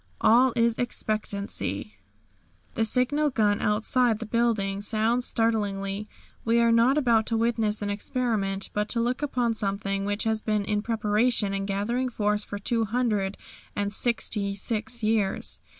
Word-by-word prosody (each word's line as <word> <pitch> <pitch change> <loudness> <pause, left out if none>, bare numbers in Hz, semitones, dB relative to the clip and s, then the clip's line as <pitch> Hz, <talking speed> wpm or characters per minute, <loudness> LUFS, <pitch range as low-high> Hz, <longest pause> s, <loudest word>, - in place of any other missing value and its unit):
All 250 +3 +5
is 230 0 +2
expectancy! 200 - -3 0.8
The 225 - +1
signal 265 +6 +1
gun 210 -5 +1
outside 225 +2 +2
the 225 - -6
building 215 -4 0
sounds 225 +4 +1
startlingly. 205 -3 -1 0.3
We 230 +1 +2
are 235 0 +4
not 235 +5 +4
about 235 -6 +3
to 225 - 0
witness 225 -2 0
an 205 - -1
experiment, 205 -3 -1
but 210 0 -1
to 235 - 0
look 245 +3 0
upon 250 -5 0
something 195 -2 -2
which 205 +1 -1
has 220 -1 0
been 210 -2 0
in 210 0 0
preparation 215 -1 +1
and 195 0 -2
gathering 235 +6 -1
force 210 -2 0
for 205 - -6
two 225 +3 0
hundred 210 -4 -1 0.4
and 205 0 -2
sixty 205 -3 0
six 230 +3 -3
years. 215 -3 0
220 Hz, 150 wpm, -26 LUFS, 205-235 Hz, 0.8 s, All